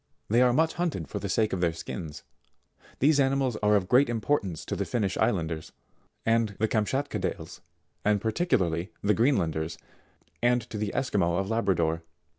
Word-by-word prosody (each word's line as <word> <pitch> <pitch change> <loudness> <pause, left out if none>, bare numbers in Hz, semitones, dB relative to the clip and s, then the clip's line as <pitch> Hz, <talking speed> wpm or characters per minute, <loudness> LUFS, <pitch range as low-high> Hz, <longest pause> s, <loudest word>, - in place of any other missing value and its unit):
They 120 +2 +5
are 125 -1 +5
much 160 +5 +2
hunted 145 - -1
for - - -4
the - - -4
sake 110 -1 +1
of 90 - -1
their 85 -2 +2
skins. 80 -2 -7 0.7
These 145 +2 +4
ani 135 0 +3
mals 130 -4 0
are 105 0 +4
of 95 -3 +1
great 125 +4 +4
importance 110 - -1
to - - -3
the - - -1
Finnish 100 -6 -1
Islanders, 80 -4 -1 0.5
the 110 -2 +1
Kamt 105 -1 0
schatkadales, 140 +2 -3 0.4
and 105 0 +3
particularly 105 - 0
the 105 +1 +3
Greenlanders, 85 - +1 0.6
and 120 -1 +2
to 110 - -4
the 105 -1 -1
ii'squi 125 -6 0
maux 85 -1 +2
of 95 +3 -2
Labrador. 85 -7 +1
105 Hz, 170 wpm, -27 LUFS, 90-125 Hz, 0.7 s, They